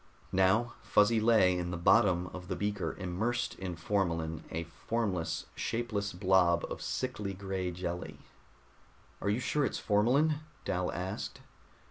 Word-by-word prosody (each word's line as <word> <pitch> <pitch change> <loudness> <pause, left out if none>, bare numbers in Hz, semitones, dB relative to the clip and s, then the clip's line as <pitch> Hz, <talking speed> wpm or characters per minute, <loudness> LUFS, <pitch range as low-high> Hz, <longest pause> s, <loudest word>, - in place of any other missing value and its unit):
Now 95 +6 +3
Fuzzy 105 +2 +4
lay 110 -5 +5
in 90 -1 -2
the 90 - -3
bottom 90 0 +4
of 90 -1 -8
the 95 - -2
beaker, 105 +2 -2
immersed 105 +7 -1
in 95 -2 -4
formalin, 85 -3 -1
a 80 +1 -3
formless, 90 +1 -2
shapeless 110 -3 -2
blob 90 -2 +3
of - - -5
sickly 105 -7 -3
gray 95 -1 -3
jelly. 90 0 -4 1.0
"Are 100 - 0
you 105 +4 +1
sure 145 +3 0
it's - - 0
formalin?" 130 +9 +3 0.3
Dal 90 0 0
asked. 95 +3 -4
95 Hz, 135 wpm, -32 LUFS, 90-110 Hz, 1.0 s, lay